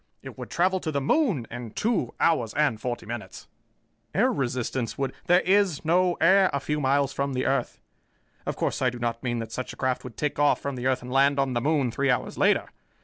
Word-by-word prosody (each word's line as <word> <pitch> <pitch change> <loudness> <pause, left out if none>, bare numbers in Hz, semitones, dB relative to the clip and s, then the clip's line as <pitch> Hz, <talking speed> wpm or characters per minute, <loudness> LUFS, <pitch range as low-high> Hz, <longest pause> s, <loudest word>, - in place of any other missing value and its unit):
It - - -9
would - - -8
travel 185 +2 +1
to 160 - -3
the 140 - 0
moon 165 - +1
in 120 -1 -6
two 225 -3 0
hours 125 -10 +1
and 145 -7 +1
forty 120 0 -4
minutes." 120 +1 -7 0.7
"Air - - +3
resistance 125 -2 -2
would 135 -1 -2
" - - -35
"There 180 +1 +5
is 190 -5 +2
no 180 +2 +3
air 190 +3 +5
a 140 - -1
few 150 +2 -2
miles 140 0 +2
from 140 0 -2
the 130 0 -1
earth. 135 -2 -1 0.7
Of - - -1
course, - - -2
I 130 - +3
do 125 - -8
not 115 -1 -2
mean 120 -1 -2
that 115 -1 -5
such 130 +2 -5
a - - -14
craft 130 -1 -1
would 125 -3 -10
take 150 -1 -2
off 145 0 +3
from 140 -1 -4
the 125 +1 -2
earth 130 -1 0
and 125 - -8
land 140 +2 +3
on 135 -2 +1
the 120 - 0
moon 140 -3 +1
three 140 +4 0
hours 125 - 0
later. - - +2
135 Hz, 230 wpm, -26 LUFS, 125-155 Hz, 0.7 s, There